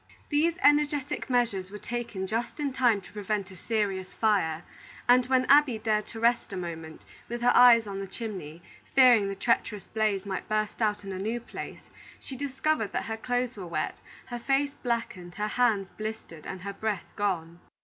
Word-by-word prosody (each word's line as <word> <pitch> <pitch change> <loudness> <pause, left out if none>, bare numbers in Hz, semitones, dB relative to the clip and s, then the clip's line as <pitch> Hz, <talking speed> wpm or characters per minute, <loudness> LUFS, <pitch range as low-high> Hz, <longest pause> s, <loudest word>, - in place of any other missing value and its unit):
These 320 +3 +2
energetic 290 -2 +2
measures 230 -7 +1
were 210 - -7
taken 230 -2 -4
just 230 +8 -3
in 285 -3 -1
time 240 -6 +3
to - - -15
prevent 205 -1 -2
a - - -11
serious 195 -2 -2
fire, 185 -7 +1 0.4
and 250 0 +5
when 260 -1 +3
Abby 280 -4 +5
dared 215 -1 0
to 225 - -8
rest 235 -1 +2
a 195 - -4
moment, 165 -3 -7 0.2
with 240 0 -4
her 245 - +4
eyes 235 -2 +8
on 195 -1 -5
the 195 - -5
chimney, 185 -7 -7 0.3
fearing 245 -6 +7
the 195 - -3
treacherous 210 -2 0
blaze 215 -3 0
might 190 -2 -4
burst 215 +1 -1
out 210 -1 +1
in 195 - -6
a 185 - -4
new 220 +5 -2
place, 235 - -9 0.3
she 270 - -8
discovered 275 -3 -1
that - - -1
her 225 - -3
clothes 245 +2 -1
were 190 -4 -7
wet, 170 - -3 0.3
her 240 -1 -6
face 275 +3 +1
blackened, 230 -9 -3
her 210 0 -2
hands 215 -5 +1
blistered, 215 -7 -7
and 185 - -6
her 200 +1 -5
breath 210 -2 -3
gone. 175 -5 -2
215 Hz, 185 wpm, -28 LUFS, 195-245 Hz, 0.4 s, eyes